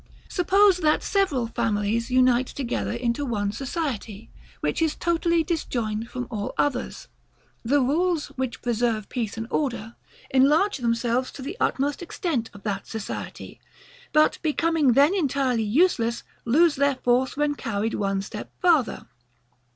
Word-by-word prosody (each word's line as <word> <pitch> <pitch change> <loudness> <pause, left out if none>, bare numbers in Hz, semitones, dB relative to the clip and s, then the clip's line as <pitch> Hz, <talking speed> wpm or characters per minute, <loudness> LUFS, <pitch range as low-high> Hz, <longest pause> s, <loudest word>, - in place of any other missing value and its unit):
Suppose 385 +1 +4
that 310 -4 +2
several 340 -12 +1
families 230 0 -1
unite 255 0 +3
together 255 -4 -3
into 235 +3 -1
one 205 -6 -1
society, 250 - -4 0.3
which - - -1
is 320 -2 +1
totally 340 -1 +1
disjoined 235 - -2
from 250 -1 -4
all 205 -3 -4
others, 270 -4 -1 0.6
the 275 +5 +3
rules, 320 +5 +1
which 260 -2 -5
preserve 230 -3 0
peace 225 -4 -3
and 225 - -3
order, 235 -6 -2 0.4
enlarge 295 +10 +4
themselves 235 +1 0
to 270 - -8
the 305 +8 -5
utmost 285 +4 0
extent 330 - -2
of 200 - -14
that 200 -2 -3
society; 220 -2 -7 0.5
but 305 0 +3
becoming 320 -3 +2
then 285 +8 +5
entirely 275 - +1
useless, 235 - +2 0.2
lose 300 +6 +4
their 280 0 +2
force 255 +2 +1
when 295 0 +1
carried 225 -4 -2
one 195 -1 -1
step - - -8
farther. 330 -9 +2
255 Hz, 135 wpm, -25 LUFS, 230-310 Hz, 0.6 s, then